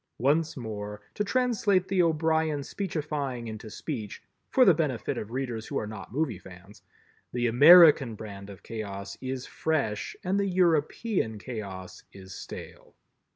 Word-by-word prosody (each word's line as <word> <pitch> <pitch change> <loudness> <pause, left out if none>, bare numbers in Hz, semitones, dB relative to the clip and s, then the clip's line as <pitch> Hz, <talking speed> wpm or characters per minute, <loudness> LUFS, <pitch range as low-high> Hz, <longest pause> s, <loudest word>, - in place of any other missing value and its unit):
Once 150 +6 +1
more, 105 -3 -6
to 210 - -1
translate 210 -5 +1
the 190 -2 +2
O'Brien 160 -2 +1
speechifying 150 -9 -3
into 110 0 -7
speech—for 125 - -2
the 185 - +7
benefit 150 -7 -1
of 105 - -5
readers 120 -3 -4
who - - -3
are - - -2
not 105 -1 -8
movie 130 - -1
fans—the 95 +6 -9
American 145 0 +8
brand 100 -2 -9
of 100 -2 -12
Chaos 100 -2 -6
is 130 -1 -4
fresh 140 -10 -2
and 190 +2 +1
the 200 - +1
European 175 - +1
Chaos 100 -5 -7
is 95 -1 -11
stale. - - -10
130 Hz, 135 wpm, -28 LUFS, 110-165 Hz, -, American